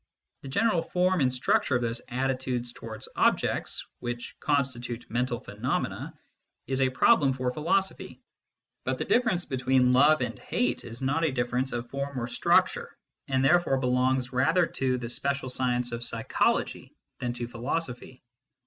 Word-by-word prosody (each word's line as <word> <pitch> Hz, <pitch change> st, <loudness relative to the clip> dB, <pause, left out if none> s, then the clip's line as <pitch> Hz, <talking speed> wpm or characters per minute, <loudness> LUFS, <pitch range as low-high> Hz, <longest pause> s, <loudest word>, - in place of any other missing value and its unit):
The -, -, -9 dB
general 190 Hz, +5 st, +2 dB
form 180 Hz, +1 st, +1 dB
and 130 Hz, -1 st, +3 dB
structure 130 Hz, +1 st, +2 dB
of 120 Hz, -, +1 dB
those 115 Hz, 0 st, -1 dB
attitudes 130 Hz, -1 st, -2 dB
towards 110 Hz, -1 st, -8 dB
objects -, -, +1 dB
which 120 Hz, 0 st, -5 dB
constitute 125 Hz, -4 st, -1 dB
mental 120 Hz, 0 st, 0 dB
phenomena 125 Hz, -, -3 dB, 0.5 s
is 135 Hz, 0 st, -1 dB
a 130 Hz, -, +4 dB
problem 135 Hz, -, +4 dB
for 130 Hz, -1 st, -1 dB
philosophy, 180 Hz, +7 st, -1 dB, 0.6 s
but -, -, -1 dB
the -, -, -3 dB
difference 190 Hz, -8 st, +2 dB
between 130 Hz, -1 st, +2 dB
love 145 Hz, +5 st, +5 dB
and -, -, -3 dB
hate 245 Hz, -, -1 dB
is 120 Hz, +2 st, -7 dB
not 145 Hz, +5 st, +1 dB
a 160 Hz, -, +2 dB
difference 125 Hz, +1 st, -1 dB
of 120 Hz, 0 st, -4 dB
form 140 Hz, 0 st, -4 dB
or 120 Hz, -, -2 dB
structure, 120 Hz, -, +1 dB, 0.3 s
and 130 Hz, 0 st, +1 dB
therefore 175 Hz, -3 st, +4 dB
belongs 125 Hz, 0 st, +1 dB
rather 160 Hz, +8 st, +3 dB
to 130 Hz, -4 st, -1 dB
the 120 Hz, -1 st, -5 dB
special 140 Hz, +2 st, -2 dB
science 125 Hz, -1 st, 0 dB
of 120 Hz, 0 st, -4 dB
psychology 115 Hz, -1 st, 0 dB, 0.2 s
than 125 Hz, -, -2 dB
to 120 Hz, -1 st, -4 dB
philosophy. 125 Hz, +2 st, -4 dB
130 Hz, 150 wpm, -28 LUFS, 120-140 Hz, 0.6 s, love